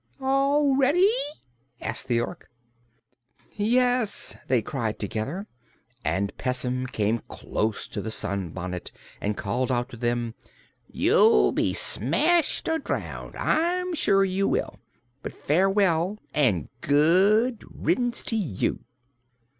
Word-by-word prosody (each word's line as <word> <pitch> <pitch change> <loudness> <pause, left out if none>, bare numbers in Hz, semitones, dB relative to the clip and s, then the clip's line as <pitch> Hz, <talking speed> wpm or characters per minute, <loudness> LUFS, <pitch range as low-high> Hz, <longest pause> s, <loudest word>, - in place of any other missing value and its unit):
"All 275 +1 +2
ready?" 330 +10 +4 0.7
asked 110 - -3
the 120 -2 +2
Ork. - - -7 1.1
"Yes!" 245 0 +1
they 125 -4 +2
cried 115 -4 -3
together, 115 - -4 0.6
and 95 +6 -1
Pessim 125 0 -1
came 110 -1 0
close 110 0 -3
to - - -4
the 110 - -5
sunbonnet 95 -4 -4 0.3
and 105 0 -2
called 125 +6 -1
out 120 +1 -1
to 120 - -10
them: 120 -1 -1 0.5
"You'll 60 0 +4
be - - 0
smashed 300 - +3
or 320 0 +1
drowned, - - -5
I'm 355 +3 0
sure 195 -11 +3
you 195 +1 0
will! - - -2 0.4
But - - -7
farewell, 190 +2 +2 0.2
and 115 - +1
good 195 - +3
riddance 245 -1 -1
to 225 - -2
you." 170 - -1
150 Hz, 115 wpm, -25 LUFS, -, 1.1 s, ready